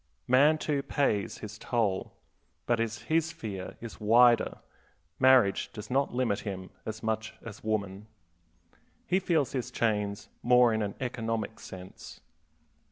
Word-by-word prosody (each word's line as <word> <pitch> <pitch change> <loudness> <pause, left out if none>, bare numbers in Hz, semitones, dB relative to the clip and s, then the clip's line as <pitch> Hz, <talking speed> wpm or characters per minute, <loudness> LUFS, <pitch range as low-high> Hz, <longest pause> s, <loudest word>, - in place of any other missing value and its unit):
Man, 145 +5 +5
too, 150 -2 -1
pays 135 -8 0
his 110 0 -9
toll, 105 -6 -1 0.5
but 120 -1 +1
as 110 -1 -2
his 160 0 +1
sphere 110 - -6
is 115 -2 -8
wider, 120 +3 +5 0.6
marriage 130 -6 +4
does 105 +1 -8
not 135 +2 +1
limit 120 -5 0
him 95 -3 -6 0.2
as 110 +1 -5
much 110 0 -2
as 110 -2 -10
woman. 105 -1 -2 1.0
He 185 - +2
feels 165 -7 +1
his 130 -3 -3
chains 105 -2 -1
more 125 -1 +5
in 110 - 0
an 100 -1 -3
economic 115 -3 -3
sense. 95 0 -10
110 Hz, 135 wpm, -29 LUFS, 105-130 Hz, 1.0 s, Man